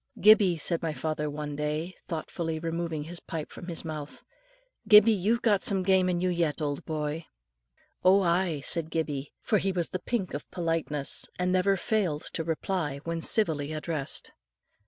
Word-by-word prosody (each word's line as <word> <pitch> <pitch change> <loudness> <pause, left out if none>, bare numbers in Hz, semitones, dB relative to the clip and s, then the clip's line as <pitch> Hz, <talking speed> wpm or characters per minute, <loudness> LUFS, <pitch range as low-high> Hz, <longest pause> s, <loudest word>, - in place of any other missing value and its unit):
"Gibbie," 205 -5 +6
said 165 +2 +2
my 165 -2 -2
father 150 +2 -2
one 145 0 -5
day, 150 +4 -3
thoughtfully 165 -1 -3
removing 165 -1 -3
his 170 +3 -6
pipe 160 -2 -6
from 175 - -10
his 170 -1 -5
mouth; 150 -2 -7 0.6
"Gibbie, 210 +1 +8
you've 215 +4 0
got 205 -4 +3
some 195 -2 +6
game 185 -1 +3
in 175 -1 0
you 185 +1 +1
yet, 170 -4 0
old 145 -2 -2
boy." 155 +1 -3 0.8
"Oh, 190 +2 +6
aye," 170 -3 +1
said 165 -2 +1
Gibbie, 150 -4 -3
for 210 - +2
he 195 - 0
was 175 -3 -1
the 185 - -3
pink 205 -2 -3
of 145 - -6
politeness, 165 -4 -1
and 180 0 0
never 190 +1 +2
failed 180 -7 -1
to 165 - -2
reply 160 -2 -2
when 165 0 -3
civilly 155 -8 +1
addressed. 155 -2 -2
165 Hz, 170 wpm, -28 LUFS, 150-185 Hz, 0.8 s, Gibbie